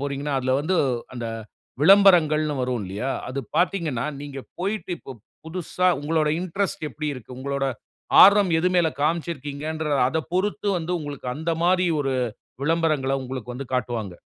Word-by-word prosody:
போகிறீங்கன்னா 140 Hz, +1 st, -2 dB
அதில 130 Hz, 0 st, 0 dB
வந்து 180 Hz, +5 st, 0 dB, 0.4 s
அந்த 120 Hz, -1 st, -4 dB, 0.5 s
விளம்பரங்கள்ன்னு 155 Hz, -5 st, +5 dB
வரும் 125 Hz, -3 st, -1 dB
இல்லையா. 100 Hz, +8 st, -3 dB, 0.2 s
அது 135 Hz, +2 st, -4 dB, 0.2 s
பார்த்தீங்கன்னா 165 Hz, -9 st, 0 dB, 0.2 s
நீங்க 145 Hz, -1 st, -7 dB, 0.2 s
போய்ட்டு 200 Hz, +2 st, -3 dB
இப்ப 135 Hz, -, -10 dB, 0.3 s
புதுசா 180 Hz, +2 st, -2 dB
உங்களோட 155 Hz, +1 st, +1 dB
இன்ட்ரெஸ்ட் 185 Hz, +1 st, -2 dB
எப்படி 155 Hz, 0 st, -4 dB
இருக்கு. 125 Hz, -1 st, -10 dB
உங்களோட 140 Hz, +1 st, -2 dB, 0.6 s
ஆர்வம் 200 Hz, -1 st, +7 dB
எது 180 Hz, +3 st, +2 dB
மேல் 170 Hz, -3 st, +3 dB
காமிச்சுருக்கீங்கற 155 Hz, -1 st, -2 dB, 0.2 s
அதைப் 160 Hz, +4 st, -3 dB
பொறுத்து 205 Hz, +2 st, 0 dB
வந்து 170 Hz, +1 st, -3 dB
உங்களுக்கு 145 Hz, -4 st, -6 dB
அந்த 160 Hz, +2 st, -3 dB
மாதிரி 180 Hz, 0 st, +3 dB, 0.2 s
ஒரு 135 Hz, -1 st, -1 dB, 0.5 s
விளம்பரங்கள்ல 150 Hz, -4 st, +1 dB
உங்களுக்கு 125 Hz, -1 st, -6 dB
வந்து 135 Hz, +2 st, -6 dB
காட்டுவாங்க. 115 Hz, -6 st, -2 dB
150 Hz, 140 wpm, -24 LUFS, 135-175 Hz, 0.6 s, ஆர்வம்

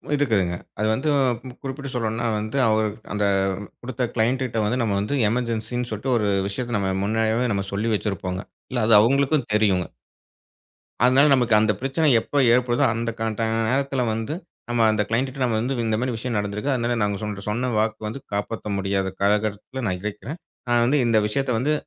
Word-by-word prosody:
இருக்குதுங்க, 105 Hz, -11 st, +1 dB, 0.2 s
அது 105 Hz, -, +1 dB
வந்து 135 Hz, +7 st, -1 dB, 0.5 s
குறிப்பிட்டு 140 Hz, 0 st, -5 dB
சொல்லணும்ன்னா 115 Hz, -1 st, -1 dB
வந்து, 110 Hz, +5 st, -4 dB
அவர் 110 Hz, 0 st, +2 dB, 0.2 s
அந்த 105 Hz, 0 st, +1 dB, 0.6 s
குடுத்த 125 Hz, 0 st, -2 dB
க்ளையண்ட்டுட்ட 120 Hz, +1 st, 0 dB
வந்து, 120 Hz, +4 st, 0 dB
நம்ம 105 Hz, -4 st, 0 dB
வந்து 105 Hz, +8 st, -1 dB
எமர்ஜென்ஸி 115 Hz, 0 st, -2 dB
ன்னு 125 Hz, 0 st, -3 dB
சொல்ட்டு, 120 Hz, +5 st, -1 dB
ஒரு 105 Hz, -2 st, 0 dB, 0.2 s
விஷயத்த 120 Hz, +3 st, -2 dB
நம்ம 95 Hz, -2 st, 0 dB
முன்னமே, 110 Hz, +3 st, +1 dB
நம்ம 100 Hz, -1 st, -1 dB
சொல்லி 105 Hz, +3 st, 0 dB
வச்சிருப்போங்க. 95 Hz, -3 st, -3 dB, 0.3 s
இல்ல 125 Hz, -3 st, 0 dB
அது 115 Hz, -, +7 dB
அவுங்களுக்கும் 135 Hz, +3 st, +2 dB
தெரியுங்க. 100 Hz, -4 st, +2 dB, 1.2 s
அதுனால 130 Hz, +3 st, +6 dB
நமக்கு 120 Hz, -3 st, +1 dB
அந்த 110 Hz, 0 st, +3 dB
பிரச்சனை 135 Hz, +4 st, +1 dB
எப்போ 145 Hz, -, -4 dB, 0.2 s
ஏற்படுதோ, 125 Hz, 0 st, +2 dB
அந்த 115 Hz, 0 st, -2 dB
க -, -, -1 dB, 0.2 s
ட -, -, +1 dB, 0.3 s
நேரத்துல 135 Hz, +1 st, 0 dB
வந்து, 115 Hz, +6 st, -3 dB, 0.4 s
நம்ம 120 Hz, -1 st, +2 dB
அந்த 110 Hz, -1 st, +1 dB
க்ளையண்ட்டுட்ட 130 Hz, +4 st, -1 dB
நம்ம 120 Hz, -3 st, +1 dB
வந்து, 125 Hz, +4 st, -1 dB
இந்த 110 Hz, -, +1 dB
மாரி 125 Hz, +1 st, -1 dB
விஷயம் 115 Hz, 0 st, -2 dB
நடந்திருக்கு. 105 Hz, +6 st, -2 dB
அதுனால, 120 Hz, -1 st, 0 dB
நாங்க 100 Hz, -1 st, 0 dB
சொன் 105 Hz, -1 st, -3 dB
சொன்ன 125 Hz, +4 st, -1 dB
வாக்கு 110 Hz, 0 st, -1 dB
வந்து, 115 Hz, +6 st, -5 dB
காப்பாத்த 105 Hz, +2 st, -3 dB
முடியாத 95 Hz, 0 st, 0 dB
காலகட்டத்துல 105 Hz, +5 st, 0 dB
நான் 90 Hz, -2 st, -1 dB
இருக்கேன். 105 Hz, +8 st, -5 dB, 0.3 s
நான் 120 Hz, -1 st, +4 dB
வந்து 140 Hz, +4 st, +3 dB
இந்த 115 Hz, -2 st, +3 dB
விஷயத்த 135 Hz, +4 st, -1 dB
வந்து, 145 Hz, +5 st, +1 dB
115 Hz, 175 wpm, -23 LUFS, 105-130 Hz, 1.2 s, அது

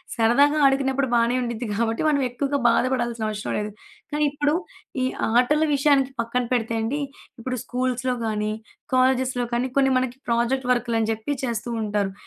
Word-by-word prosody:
సరదాగా 265 Hz, +6 st, +4 dB
ఆడుకున్నప్పుడు 270 Hz, 0 st, +2 dB
బానే 235 Hz, +1 st, +3 dB
ఉండిద్ది. 235 Hz, 0 st, -4 dB
కాబట్టి 225 Hz, 0 st, 0 dB
మనం 285 Hz, -2 st, +2 dB
ఎక్కువగా 280 Hz, +3 st, -1 dB
బాధపడాల్సిన 240 Hz, -2 st, 0 dB
అవషరం 210 Hz, -1 st, -3 dB
లేదు. 210 Hz, 0 st, -4 dB, 0.4 s
కానీ 300 Hz, 0 st, +2 dB
ఇప్పుడు 290 Hz, +1 st, 0 dB, 0.5 s
ఈ -, -, +2 dB, 0.3 s
ఆటల 295 Hz, +6 st, +4 dB
విషయానికి 275 Hz, -1 st, +3 dB
పక్కన 240 Hz, +2 st, -1 dB
పెడితే 230 Hz, -2 st, 0 dB
అండి, 265 Hz, +7 st, -1 dB, 0.4 s
ఇప్పుడు 255 Hz, +2 st, -3 dB
స్కూల్స్‌లో 255 Hz, 0 st, -1 dB
కానీ, 215 Hz, -1 st, -1 dB, 0.4 s
కాలేజెస్‌లో 255 Hz, -1 st, +2 dB
కానీ 240 Hz, +2 st, +1 dB
కొన్ని 270 Hz, -1 st, +4 dB
మనకి 255 Hz, 0 st, -3 dB
ప్రాజెక్ట్ 240 Hz, +2 st, 0 dB
వర్కులని 230 Hz, -2 st, 0 dB
జెప్పి 220 Hz, +6 st, -2 dB
చేస్తూ 235 Hz, 0 st, -3 dB
ఉంటారు. 205 Hz, -2 st, -1 dB
250 Hz, 145 wpm, -24 LUFS, 230-270 Hz, 0.5 s, సరదాగా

